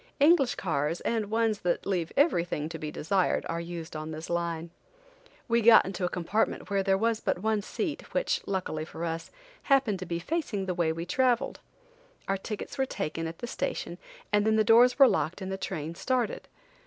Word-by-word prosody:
English 285 -3 +5
cars, 155 -1 -1
and 220 -3 -1
ones 225 -1 +1
that 175 -1 -1
leave 180 -4 -1
everything 175 - +2
to 165 - -7
be 155 - -4
desired, 185 +5 0
are 165 0 -2
used 170 -2 -7
on 155 0 -5
this 160 +2 -6
line. 170 -1 -2 0.8
We 235 -1 +3
got 230 0 +8
into 190 -1 -3
a - - 0
compartment 195 +4 -1
where 200 -1 +2
there 195 0 +2
was 225 +1 +1
but 180 - -2
one 220 -1 +1
seat, - - -4
which, - - 0
luckily 185 -5 -2
for 160 +1 -6
us, 165 0 -4 0.3
happened 260 -9 +2
to 185 - -6
be 170 - -2
facing 210 - -2
the 185 - -1
way 170 -2 +1
we 165 +1 -4
traveled. 255 +5 +1 0.7
Our 195 - +1
tickets 210 +6 -6
were 265 - +2
taken 165 -7 -3
at 165 +1 -7
the - - -5
station, 240 - -4 0.3
and 205 0 +4
then 220 +1 +3
the 215 - +4
doors 240 +3 +6
were 275 -2 +8
locked 175 -6 0
and 190 -1 -5
the - - -1
train 160 -4 -4
started. 245 +5 -1
195 Hz, 195 wpm, -28 LUFS, 170-230 Hz, 0.8 s, got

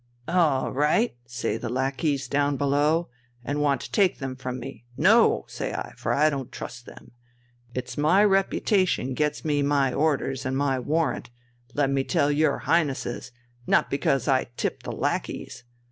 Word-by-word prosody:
'All 160 -7 +2
right,' 150 - +2
say 120 +1 -2
the 120 - -5
lackeys 135 +2 -1
down 145 +1 +1
below, 145 +4 +1 0.4
and 145 +2 -1
want 140 -3 +2
to - - -8
take 195 -3 +3
them 135 -2 -5
from 130 -1 -5
me, 135 -1 -9
'No!' - - +4
say - - -4
I, - - -5
for - - -3
I 155 +2 +3
don't 135 -3 -4
trust 120 0 -8
them. - - -13 0.6
It's 130 +3 -4
my 175 +7 +4
reputation 195 - +2
gets 150 +4 -1
me 145 -2 +1
my 140 -2 +2
orders 135 -3 0
and 130 +1 -1
my 135 -2 +1
warrant, 150 -1 -1 0.5
let 140 -2 +2
me 135 -1 +1
tell 145 +2 +1
your 145 -1 +1
Highnesses, 135 -6 0 0.4
not - - +3
because 140 -2 +1
I 130 -2 +3
tip - - -2
the - - -6
lackeys. - - -3
140 Hz, 160 wpm, -25 LUFS, 130-155 Hz, 0.6 s, No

